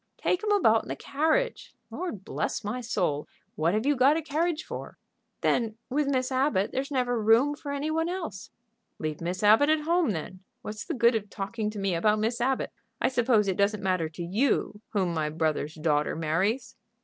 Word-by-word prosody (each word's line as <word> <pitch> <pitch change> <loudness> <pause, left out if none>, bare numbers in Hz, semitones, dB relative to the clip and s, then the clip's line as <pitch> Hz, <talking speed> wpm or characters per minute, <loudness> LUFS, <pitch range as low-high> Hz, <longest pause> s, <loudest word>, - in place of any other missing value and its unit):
"Take 365 - 0
'em 425 - 0
about 225 - +4
in - - -14
the - - -2
carriage. 320 - -1 0.2
Lord 220 - -5
bless - - -2
my 220 +5 -3
soul! 180 -11 -1 0.3
what 165 +5 +1
have 220 +3 0
you 290 0 +3
got 275 +4 +5
a 325 - -3
carriage 320 +2 -1
for?" - - -7 0.4
"Then, 225 -2 +1
with 290 +2 +1
Miss 260 -2 0
Abbott, 255 -7 +1
there's 270 +1 -2
never 245 -4 0
room 230 +7 +4
for 290 -1 -6
any 285 +2 -2
one 325 +1 0
else." 330 - -5 0.5
"Leave 155 0 -4
Miss 180 +4 -3
Abbott 220 +8 +6
at 310 0 +3
home, 335 0 +2
then. 185 0 -4 0.2
What's 210 0 -6
the - - -3
good 235 0 +4
of 210 -2 -2
talking 210 +2 -3
to 215 - -8
me 195 -2 0
about 210 +5 +2
Miss 230 +3 -1
Abbott? 265 +1 0 0.3
I - - +2
suppose 235 -5 +2
it 190 - 0
doesn't 200 0 +1
matter 185 -4 0
to 170 +2 -7
you 210 +2 0
whom 190 -5 0
my 155 -2 -1
brother's 155 -1 -1
daughter 150 -2 +1
marries?" 190 +10 -1
225 Hz, 195 wpm, -28 LUFS, 190-280 Hz, 0.5 s, Abbott